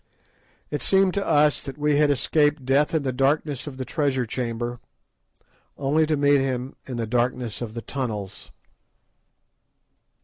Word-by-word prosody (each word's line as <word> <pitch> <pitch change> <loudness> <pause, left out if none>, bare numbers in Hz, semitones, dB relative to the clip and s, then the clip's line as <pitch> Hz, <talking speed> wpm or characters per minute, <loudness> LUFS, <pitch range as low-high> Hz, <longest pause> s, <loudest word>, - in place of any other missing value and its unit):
It 150 - -2
seemed 190 -1 +3
to 200 - 0
us 150 0 +3
that 135 - -8
we 150 -1 +2
had 150 0 +4
escaped 145 0 +2
Death 140 +4 +2
in 155 - +1
the 130 - -1
darkness 140 +1 0
of 135 -3 -7
the 130 - -4
treasure 140 -5 0
chamber 120 0 -3 1.0
only 150 +3 +2
to 155 -1 +1
meet 145 -1 +4
him 130 0 -3
in 125 -2 -5
the 115 - -1
darkness 120 0 -1
of 115 -2 -5
the 115 - -5
tunnels. 105 -8 -5
135 Hz, 150 wpm, -24 LUFS, 125-150 Hz, 1.0 s, had